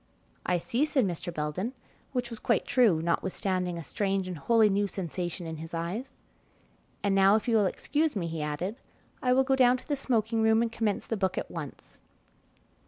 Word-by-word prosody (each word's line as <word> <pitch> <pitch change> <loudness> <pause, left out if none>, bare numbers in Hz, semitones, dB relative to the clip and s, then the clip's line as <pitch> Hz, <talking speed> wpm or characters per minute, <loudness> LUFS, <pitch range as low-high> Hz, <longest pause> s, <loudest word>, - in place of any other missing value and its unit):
"I 180 - +3
see," 235 - 0
said 290 -6 +2
Mr. 175 -1 -3
Belden, 165 - -3 0.4
which 250 -2 -2
was 230 - -6
quite - - +1
true, 215 -11 +3
notwithstanding 180 +1 -1
a 165 - -5
strange 195 +3 -1
and 180 - -4
wholly 220 +8 +4
new 200 0 +1
sensation 180 -1 -4
in 160 -1 -5
his 165 +2 -7
eyes. 185 +11 -3 0.9
"And 200 -1 +2
now 195 +1 +6
if 220 - -1
you 230 - +3
will 210 -3 +4
excuse 300 - 0
me," 185 -4 -1
he 165 -1 -4
added, 150 +9 -3 0.4
"I 250 - +2
will 265 +1 +5
go 265 0 +2
down 255 -1 +5
to - - -16
the 290 - 0
smoking 230 -4 0
room 220 +1 +4
and 230 - -2
commence 220 -3 -1
the 225 - -2
book 190 -2 0
at - - -3
once." 150 -5 -8
200 Hz, 195 wpm, -29 LUFS, 175-235 Hz, 0.9 s, now